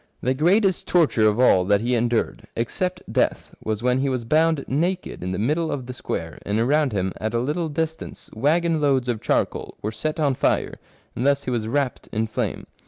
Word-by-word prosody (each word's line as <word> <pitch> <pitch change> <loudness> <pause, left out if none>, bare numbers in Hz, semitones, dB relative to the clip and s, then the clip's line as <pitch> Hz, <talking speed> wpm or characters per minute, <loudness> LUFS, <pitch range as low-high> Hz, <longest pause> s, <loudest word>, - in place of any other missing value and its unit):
The 130 - +1
greatest 185 +7 +2
torture 150 -11 +3
of 105 +2 +1
all 95 -7 +5
that 100 +1 +3
he 120 +2 0
endured, 120 -1 0
except 180 - -2
death, - - 0
was 110 +1 -2
when 125 +1 +2
he 140 +1 +1
was 125 -3 -2
bound 155 +3 +2
naked 175 +7 -1
in 90 - -3
the 90 - -2
middle 150 - 0
of 130 -3 -3
the 125 - -6
square, 80 -9 -5
and 105 +2 -1
around 145 +4 +2
him 95 -2 -1
at 110 +2 -2
a - - +2
little 150 +6 -1
distance 160 +1 -4
waggon 160 +6 +1
loads 135 -4 +2
of 120 -3 -1
charcoal - - -1
were 105 - -1
set 155 +9 -3
on 145 -3 +2
fire, - - 0 0.4
and 120 - -2
thus 140 0 +2
he 130 - -3
was 115 -3 -1
wrapped 135 +1 -1
in 110 0 0
flame. 110 - -3
130 Hz, 205 wpm, -23 LUFS, 115-155 Hz, 0.4 s, all